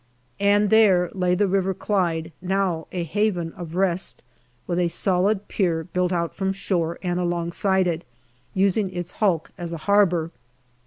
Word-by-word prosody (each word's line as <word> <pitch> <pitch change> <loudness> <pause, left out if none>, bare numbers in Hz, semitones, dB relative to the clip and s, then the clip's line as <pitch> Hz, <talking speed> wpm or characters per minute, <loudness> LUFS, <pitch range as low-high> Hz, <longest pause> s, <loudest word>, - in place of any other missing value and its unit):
And 205 0 +3
there 190 -6 +5
lay 180 -2 +1
the 205 +2 +2
River 190 0 0
Clyde, 170 -6 -1
now 185 -3 -1
a 180 -2 -2
haven 175 -1 -1
of 170 -2 -8
rest, 185 -1 -1 0.4
with 175 0 -1
a 175 - +2
solid 195 +3 +1
pier 170 -5 0
built 180 +1 -1
out 170 -2 -1
from 190 0 -1
shore 170 -4 -1
and 175 -1 -1
alongside 175 +2 +1
it, 170 -1 -1 0.5
using 195 +1 +2
its 175 -1 -5
hulk 185 -7 0
as 170 -1 -5
a - - -3
harbour. 180 -5 +3
180 Hz, 155 wpm, -23 LUFS, 170-195 Hz, 0.5 s, there